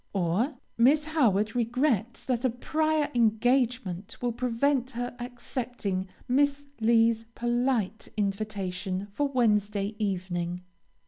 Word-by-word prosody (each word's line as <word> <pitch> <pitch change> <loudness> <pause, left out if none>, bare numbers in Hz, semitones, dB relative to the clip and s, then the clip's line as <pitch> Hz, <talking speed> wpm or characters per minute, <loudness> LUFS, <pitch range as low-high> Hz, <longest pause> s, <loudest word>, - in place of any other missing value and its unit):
or, 195 - +1 0.2
Miss 290 +6 +5
Howard 225 -9 +2
regrets 240 -1 0
that 250 -2 -1
a 260 - +3
prior 310 +5 0
engagement 235 -4 +1
will 245 -1 0
prevent 250 +2 +1
her 245 0 -3
accepting 240 -5 -3 0.2
Miss 285 +2 +2
Lee's 230 0 +3
polite 240 -3 0
invitation 195 -2 -2
for 290 +6 +1
Wednesday 210 -5 +1
evening. 180 -3 -2
235 Hz, 105 wpm, -28 LUFS, 205-255 Hz, 0.2 s, Miss